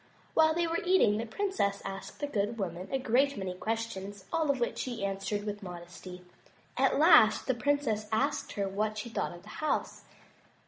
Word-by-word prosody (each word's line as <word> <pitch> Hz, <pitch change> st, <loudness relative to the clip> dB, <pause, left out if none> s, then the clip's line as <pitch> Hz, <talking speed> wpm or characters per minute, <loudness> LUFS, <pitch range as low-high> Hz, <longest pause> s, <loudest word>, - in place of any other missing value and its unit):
While 315 Hz, 0 st, +4 dB
they 340 Hz, 0 st, +2 dB
were 330 Hz, 0 st, -1 dB
eating 355 Hz, -, +4 dB
the 230 Hz, +2 st, -3 dB
princess 225 Hz, -, -1 dB
asked 195 Hz, +8 st, -7 dB
the -, -, +1 dB
good 220 Hz, -4 st, -1 dB
woman 185 Hz, -2 st, -4 dB
a 270 Hz, -, +2 dB
great 265 Hz, +3 st, +2 dB
many 190 Hz, -2 st, -3 dB
questions, 205 Hz, -1 st, -4 dB
all 320 Hz, -2 st, +1 dB
of 275 Hz, -2 st, +2 dB
which 235 Hz, -, -1 dB
she 240 Hz, -5 st, -3 dB
answered 195 Hz, +1 st, -2 dB
with 205 Hz, 0 st, -4 dB
modesty. 180 Hz, 0 st, -9 dB, 0.5 s
At -, -, +3 dB
last -, -, +6 dB
the 260 Hz, -, +2 dB
princess 235 Hz, -4 st, 0 dB
asked 220 Hz, 0 st, 0 dB
her 200 Hz, -1 st, -1 dB
what 215 Hz, +2 st, -1 dB
she 215 Hz, +3 st, -4 dB
thought 225 Hz, -, -2 dB
of 175 Hz, -, -13 dB
the 210 Hz, -, -13 dB
house. 310 Hz, -, -1 dB
215 Hz, 185 wpm, -30 LUFS, 195-275 Hz, 0.5 s, last